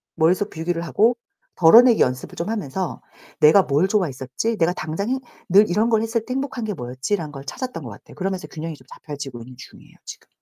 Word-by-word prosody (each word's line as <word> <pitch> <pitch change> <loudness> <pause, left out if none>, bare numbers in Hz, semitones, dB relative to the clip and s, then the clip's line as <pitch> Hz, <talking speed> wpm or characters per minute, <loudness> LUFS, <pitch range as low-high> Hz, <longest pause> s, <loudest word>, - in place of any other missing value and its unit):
머릿속 180 +5 +2
비우기를 165 +1 -3
하고 220 +8 +2 0.4
덜어내기 230 +8 +7
연습을 125 0 -1
좀 170 - -4
하면서 190 -5 -3 0.4
'내가 160 +6 +7
뭘 150 +5 +2
좋아했었지? 180 - -1
내가 170 0 +2
당장 165 +6 -4
행 260 +1 0 0.3
늘 200 +4 +6
이런 215 +6 +2
걸 220 -2 +3
했을 225 0 -2
때 255 - -4
행복한 265 -2 -3
게 210 - -2
뭐였지?'라는 145 +5 -3
걸 135 -1 -10
찾았던 250 - -5
것 120 - -7
같아요. 100 - -14
그러면서 190 -1 -3
균형이 160 0 -6
좀 130 - -20
잡혀지고 140 -5 -8
있는 125 +2 -12
중이에요, - - -15
지금. - - -10
175 Hz, 445 characters per minute, -22 LUFS, 145-215 Hz, 0.4 s, 덜어내기